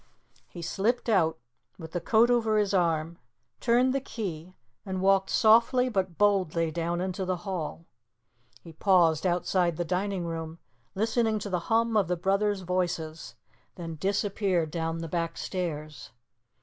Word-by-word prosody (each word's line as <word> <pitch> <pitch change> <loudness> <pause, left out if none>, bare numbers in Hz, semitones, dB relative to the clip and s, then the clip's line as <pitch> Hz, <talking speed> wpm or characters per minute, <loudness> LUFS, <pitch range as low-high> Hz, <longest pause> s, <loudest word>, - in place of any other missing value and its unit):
He 170 - -9
slipped 225 +8 -1
out 165 -7 +2 0.4
with 160 -2 -9
the 175 - -3
coat 230 +2 +4
over 225 -3 +2
his 205 -1 +1
arm, 165 -2 0 0.4
turned 250 +2 +3
the 275 - 0
key 185 -8 -6 0.3
and 190 -1 -4
walked 195 0 +3
softly 235 +3 +4
but 190 -6 -2
boldly 180 -6 +2
down 170 +2 -2
into 185 +1 -3
the 185 0 -1
hall. 170 -3 -4 0.8
He 165 - -12
paused 170 -2 +3
outside 175 -1 +1
the 175 - -1
dining 185 +1 -2
room, 165 -1 -5 0.4
listening 220 +1 +1
to 205 -1 -5
the 180 - +1
hum 230 0 +2
of 205 -3 +3
the 180 0 -1
brothers' 195 +3 +1
voices, 175 -3 -3 0.4
then 165 -2 -6
disappeared 195 -3 0
down 165 0 -2
the 165 0 -5
back 165 0 -3
stairs. 155 - -5
185 Hz, 150 wpm, -28 LUFS, 165-205 Hz, 0.8 s, coat